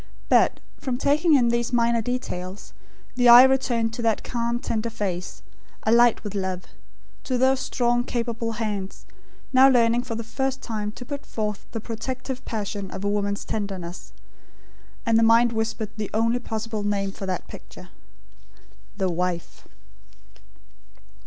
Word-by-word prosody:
But, - - +4 0.2
from 255 -3 -2
taking 300 +4 +3
in 245 -4 +4
these 235 0 0
minor 235 -1 +2
details, 205 -5 -5 0.4
the 245 -1 +4
eye 240 +1 +11
returned 245 -4 +2
to 235 - -4
that 225 -2 +1
calm 235 0 -1
tender 230 -1 -2
face, 190 -5 -4 0.4
alight 235 +1 +4
with 210 -2 -5
love; 190 -2 -3 0.6
to 255 - 0
those 260 +1 +3
strong 240 -2 +1
capable 230 -2 -2
hands, 210 -4 -4 0.5
now 260 +1 +7
learning 235 -2 +3
for 245 -2 -5
the 230 - -4
first 265 +3 -2
time 215 -4 -4
to 245 - -9
put 285 +2 -6
forth 210 -5 -4
the 225 - -3
protective 255 +3 -5
passion 205 -3 -4
of 190 - -7
a - - 0
woman's 200 0 -1
tenderness; 190 -4 -5 0.9
and 225 -1 +4
the - - +3
mind 230 +1 +5
whispered 220 -1 -2
the 210 -2 -3
only 230 +2 +2
possible 220 -2 -4
name 200 -1 -1
for 195 0 -7
that 185 - -3
picture: - - -12 1.1
The 190 -2 0
Wife. 175 0 -3
230 Hz, 145 wpm, -24 LUFS, 205-245 Hz, 1.1 s, eye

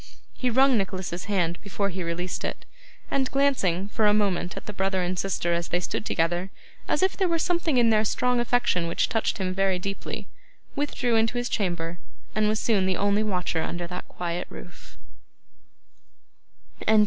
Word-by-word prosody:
He 255 - -1
wrung 260 0 +5
Nicholas's 185 -2 -3
hand 180 -4 0
before 200 0 -1
he 185 0 -4
released 175 +1 -3
it; - - -4 0.5
and 265 -2 +1
glancing, 200 -10 +2
for 215 0 +2
a 210 - +5
moment, 195 -3 0
at - - -6
the 210 - -6
brother 190 -1 0
and 180 +1 -1
sister 175 -3 0
as 170 0 -1
they 175 - +1
stood 180 - -3
together, 175 +3 0 0.4
as - - +2
if 380 - +2
there 380 - +2
were 335 -1 +2
something 335 -4 +1
in 235 -2 +5
their 215 0 +4
strong 250 +3 +1
affection 240 -8 +2
which 170 - +1
touched 225 - 0
him 185 -2 -1
very 190 -1 +2
deeply, 195 +2 -5 0.5
withdrew 275 -4 0
into 225 +2 +2
his 245 0 -1
chamber, 175 -4 -1 0.3
and 215 0 +2
was 215 0 +1
soon 200 -5 +2
the 185 - +1
only 205 +1 +2
watcher 180 -5 0
under 175 +2 -3
that 180 +1 -6
quiet 175 0 -4
roof. - - -12
195 Hz, 175 wpm, -26 LUFS, 180-235 Hz, 0.5 s, wrung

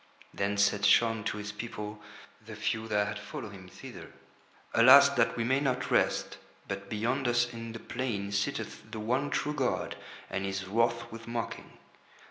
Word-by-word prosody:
Then 100 +1 -1
said 100 0 +3
Shaun 115 -1 +4
to 110 - -1
his 105 0 -5
people, 105 -1 -6 0.4
the 110 - -9
few 105 +1 -2
that 105 -1 +2
had 100 0 -4
followed 105 0 -7
him 95 -2 -12
thither: - - -10 0.6
"Alas 135 +5 +9
that 125 -5 +1
we 115 - 0
may 130 +4 +2
not 135 -3 -1
rest, - - +1 0.3
but 100 0 -5
beyond 125 +5 0
us 120 0 +2
in 115 0 -6
the 115 - -7
plain 110 -6 -3
sitteth 100 +1 -3
the 110 -1 -6
one 125 +7 0
true 150 - -1
god 135 -4 -1 0.3
and 95 - -3
he 95 - -1
is 95 0 -3
wroth 115 +3 +1
with 115 0 -9
mocking. 115 -1 -5
115 Hz, 175 wpm, -30 LUFS, 105-120 Hz, 0.6 s, Alas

